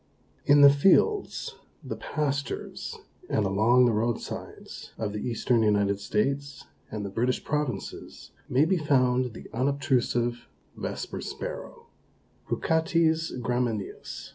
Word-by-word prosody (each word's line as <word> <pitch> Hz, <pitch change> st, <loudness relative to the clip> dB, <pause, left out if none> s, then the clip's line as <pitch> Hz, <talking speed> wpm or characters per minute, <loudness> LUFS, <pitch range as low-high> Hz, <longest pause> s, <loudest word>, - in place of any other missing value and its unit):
In 145 Hz, 0 st, +6 dB
the 140 Hz, 0 st, +10 dB
fields, 195 Hz, -, +2 dB, 0.3 s
the -, -, -5 dB
pastures 140 Hz, -2 st, -3 dB, 0.3 s
and 105 Hz, -, +1 dB
along 110 Hz, +6 st, +4 dB
the 120 Hz, -, +3 dB
roadsides 115 Hz, +2 st, -4 dB
of 105 Hz, -2 st, -3 dB
the 105 Hz, -, -3 dB
Eastern 120 Hz, 0 st, +1 dB
United 100 Hz, -2 st, +2 dB
States 140 Hz, +7 st, -2 dB, 0.2 s
and 105 Hz, -2 st, -4 dB
the -, -, -4 dB
British 120 Hz, +4 st, 0 dB
Provinces 145 Hz, -9 st, -4 dB, 0.2 s
may 135 Hz, +4 st, +4 dB
be 185 Hz, +3 st, +2 dB
found 130 Hz, -5 st, +2 dB
the -, -, -9 dB
unobtrusive 120 Hz, -2 st, 0 dB, 0.3 s
Vesper -, -, -5 dB
Sparrow -, -, -7 dB, 0.6 s
(Poocaetes 160 Hz, 0 st, +1 dB
gramineus). 120 Hz, -4 st, -3 dB
125 Hz, 115 wpm, -27 LUFS, 110-145 Hz, 0.6 s, the